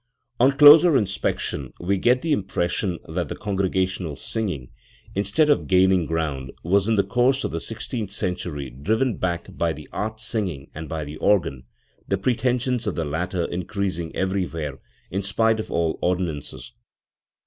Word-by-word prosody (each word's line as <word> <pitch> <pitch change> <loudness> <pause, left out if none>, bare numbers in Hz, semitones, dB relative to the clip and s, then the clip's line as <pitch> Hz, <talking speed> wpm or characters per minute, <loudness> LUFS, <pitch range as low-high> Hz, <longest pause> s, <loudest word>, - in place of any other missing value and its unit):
On 130 +3 +6
closer 150 +1 +9
inspection 95 - -2
we 95 +2 0
get 125 +5 +3
the 165 - -1
impression 95 - 0
that 85 0 -2
the - - -4
congregational 95 -5 -1
singing, 90 - -4 0.4
instead 100 +10 +2
of 145 - +2
gaining 95 -2 +4
ground, 75 -5 -2
was 100 +4 +2
in 115 - +3
the 100 - +3
course 125 +6 +2
of - - -2
the 80 - -3
sixteenth 115 +1 -4
century 85 -8 -3
driven 110 - 0
back 85 -2 -3
by 85 -1 0
the 75 0 -11
art 110 +1 -3
singing 100 -10 -3
and 80 0 -7
by 80 -2 -3
the 75 +1 -8
organ, 75 -12 +1 0.4
the 95 - +1
pretensions 125 +2 0
of 105 - -1
the 80 - -1
latter 85 +4 -2
increasing 90 -1 -3
everywhere, 85 -7 -2 0.3
in 95 +3 -1
spite 110 +3 +2
of 110 - -4
all 85 -1 0
ordinances 90 -5 -2
*. - - -46
95 Hz, 160 wpm, -24 LUFS, 80-110 Hz, 0.4 s, closer